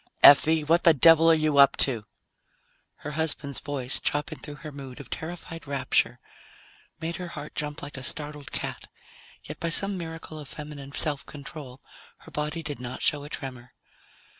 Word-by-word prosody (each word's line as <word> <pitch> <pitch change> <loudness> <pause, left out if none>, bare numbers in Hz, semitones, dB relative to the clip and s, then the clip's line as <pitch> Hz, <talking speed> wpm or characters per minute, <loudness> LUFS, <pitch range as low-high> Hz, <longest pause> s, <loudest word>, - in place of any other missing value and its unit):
_ - - -37 0.2
"Effie! 155 +2 +8
What 165 +3 +3
the 165 -2 +7
devil 165 +3 +7
are 165 - +7
you 155 -2 +2
up 140 - +7
to?" 115 -6 +1 1.0
Her 150 - -3
husband's 150 -2 -1
voice, 135 -3 -1
chopping 150 +1 -1
through 145 - -8
her 155 - -5
mood 135 -3 -9
of 140 - -11
terrified 165 -1 -6
rapture, 130 -3 +1 0.8
made 165 +2 -3
her 180 -1 -5
heart 150 -3 -8
jump 150 -1 -4
like 145 -1 -7
a - - -6
startled 150 +1 -1
cat, - - -3 0.6
yet 150 - -8
by 170 - -1
some 195 +3 +3
miracle 160 -2 -7
of 145 - -9
feminine 145 -1 -8
self 145 -1 -1
control 140 -2 -9 0.4
her - - -16
body 150 +2 -3
did 145 -3 -5
not 125 0 -6
show 145 -1 +2
a 145 - -9
tremor. 125 -5 -7
150 Hz, 175 wpm, -27 LUFS, 140-160 Hz, 1.0 s, Effie